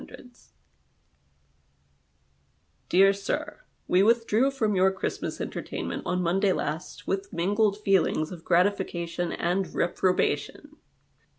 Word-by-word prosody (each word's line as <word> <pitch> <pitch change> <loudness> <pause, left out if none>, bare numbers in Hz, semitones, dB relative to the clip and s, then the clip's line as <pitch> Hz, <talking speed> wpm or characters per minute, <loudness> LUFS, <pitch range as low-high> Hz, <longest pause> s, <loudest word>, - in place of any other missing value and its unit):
Dear 195 +2 +5
Sir, 200 - -4
— - - -44
We 180 - +4
withdrew 230 +3 +3
from 220 -7 -1
your 190 +1 +4
Ciiristmas 190 - -4
cntertaimnent - - -4
on 180 0 0
Monday 190 +3 +2
last 155 +1 -5
with 195 +1 -3
mingled 200 +4 +1
feelings 180 -5 +2
of 170 -3 -9
gratification 175 -2 0
and 180 +2 -1
reprobation. 180 +1 -1
190 Hz, 100 wpm, -26 LUFS, 175-200 Hz, -, Dear